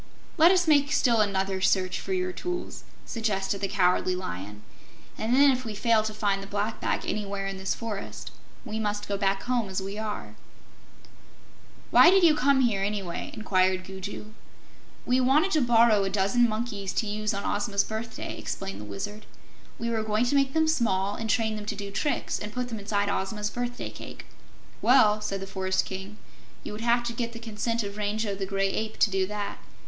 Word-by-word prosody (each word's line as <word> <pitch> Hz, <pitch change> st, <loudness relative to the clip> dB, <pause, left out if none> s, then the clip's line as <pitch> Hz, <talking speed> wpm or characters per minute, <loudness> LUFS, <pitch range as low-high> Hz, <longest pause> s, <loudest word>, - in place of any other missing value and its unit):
"Let 330 Hz, 0 st, +7 dB
us 360 Hz, -2 st, +3 dB
make 290 Hz, -2 st, +4 dB
still 235 Hz, -7 st, +3 dB
another 195 Hz, -2 st, 0 dB
search 185 Hz, -1 st, +2 dB
for -, -, -6 dB
your 185 Hz, -1 st, 0 dB
tools," 355 Hz, -, -5 dB, 0.2 s
suggested 200 Hz, -3 st, -2 dB
the 195 Hz, -, 0 dB
Cowardly 185 Hz, -2 st, +2 dB
Lion, 105 Hz, -, -6 dB, 0.5 s
"and 230 Hz, +3 st, 0 dB
then, 280 Hz, +1 st, +7 dB
if 255 Hz, -1 st, -1 dB
we 220 Hz, -3 st, -5 dB
fail 225 Hz, +1 st, +3 dB
to 215 Hz, 0 st, -3 dB
find 205 Hz, -2 st, 0 dB
the 195 Hz, -, -8 dB
Black 205 Hz, +2 st, -2 dB
Bag -, -, -1 dB
anywhere 200 Hz, -1 st, -2 dB
in 195 Hz, 0 st, -4 dB
this 190 Hz, 0 st, -2 dB
forest, 220 Hz, -4 st, -6 dB, 0.3 s
we 220 Hz, -, -4 dB
must 205 Hz, -1 st, -2 dB
go 200 Hz, -, -1 dB
back 195 Hz, -1 st, 0 dB
home 245 Hz, -5 st, 0 dB
as 190 Hz, -, -2 dB
we 195 Hz, +2 st, -5 dB
are." 210 Hz, -, -5 dB, 1.6 s
"Why 255 Hz, +7 st, +8 dB
did 380 Hz, 0 st, +5 dB
you 325 Hz, -3 st, +7 dB
come 280 Hz, -2 st, +3 dB
here, 220 Hz, -6 st, +2 dB
anyway?" 195 Hz, -3 st, -3 dB
inquired 185 Hz, -3 st, +1 dB
Gugu. 195 Hz, +3 st, -7 dB, 0.7 s
"We 255 Hz, +1 st, +3 dB
wanted 295 Hz, +9 st, +3 dB
to 310 Hz, -, +3 dB
borrow 230 Hz, -4 st, +5 dB
a 195 Hz, -, 0 dB
dozen 205 Hz, +5 st, +2 dB
monkeys, 215 Hz, -3 st, -3 dB
to -, -, 0 dB
use 215 Hz, 0 st, -2 dB
on 200 Hz, -1 st, -3 dB
Ozma's 200 Hz, -1 st, +1 dB
birthday," 220 Hz, +1 st, -5 dB
explained 95 Hz, +1 st, -5 dB
the -, -, -8 dB
Wizard. 155 Hz, -, -6 dB, 0.5 s
"We 235 Hz, 0 st, -2 dB
were 225 Hz, -1 st, 0 dB
going 215 Hz, +2 st, +1 dB
to 245 Hz, -, +1 dB
make 275 Hz, -1 st, +2 dB
them 320 Hz, 0 st, +3 dB
small, 205 Hz, -10 st, +1 dB
and 225 Hz, +1 st, -4 dB
train 220 Hz, -1 st, +1 dB
them 210 Hz, -1 st, -7 dB
to -, -, -2 dB
do 200 Hz, 0 st, -6 dB
tricks, 290 Hz, +8 st, -1 dB
and 210 Hz, -, -6 dB
put 250 Hz, +1 st, -3 dB
them 225 Hz, -2 st, -4 dB
inside 205 Hz, 0 st, 0 dB
Ozma's 210 Hz, +2 st, -2 dB
birthday 245 Hz, +1 st, -4 dB
cake." -, -, -10 dB, 0.6 s
"Well," 215 Hz, -5 st, +5 dB
said 195 Hz, -2 st, -3 dB
the -, -, -4 dB
Forest 190 Hz, -1 st, -1 dB
King, 190 Hz, +2 st, -7 dB, 0.5 s
"you -, -, -6 dB
would 210 Hz, +1 st, -6 dB
have 240 Hz, +1 st, +3 dB
to 240 Hz, 0 st, -3 dB
get 235 Hz, 0 st, -3 dB
the -, -, -7 dB
consent 230 Hz, 0 st, -2 dB
of 200 Hz, 0 st, -6 dB
Rango 210 Hz, 0 st, -1 dB
the 195 Hz, -1 st, -4 dB
Gray 195 Hz, 0 st, 0 dB
Ape, 220 Hz, +1 st, -3 dB
to 210 Hz, -, +3 dB
do 190 Hz, 0 st, +1 dB
that. 205 Hz, 0 st, -4 dB
210 Hz, 195 wpm, -27 LUFS, 195-235 Hz, 1.6 s, Why